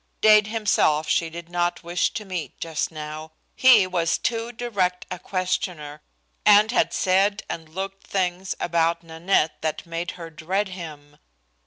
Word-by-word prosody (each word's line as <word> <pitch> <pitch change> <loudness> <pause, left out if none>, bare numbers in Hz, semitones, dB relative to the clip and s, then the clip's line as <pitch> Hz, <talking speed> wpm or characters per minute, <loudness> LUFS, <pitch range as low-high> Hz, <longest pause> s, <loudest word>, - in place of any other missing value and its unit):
Dade 215 -1 +6
himself 195 -8 +1
she 165 - +1
did 170 +1 -9
not 175 0 -1
wish 170 +1 0
to 215 - -4
meet 180 -4 -6
just 160 -2 -2
now. 155 0 -7 0.2
He 245 -7 +7
was 175 -2 0
too 230 0 -2
direct 200 -7 -1
a 180 - -4
questioner, 180 -5 -3 0.4
and 210 +2 +6
had 245 - +2
said 200 +2 +2
and 160 -1 -6
looked 195 +3 -6
things 185 -1 -1
about 170 0 +1
Nanette 165 0 0
that 155 -1 -3
made 170 +1 -4
her 165 -2 -8
dread 185 +6 -2
him. 150 -5 -9
175 Hz, 150 wpm, -24 LUFS, 160-195 Hz, 0.4 s, He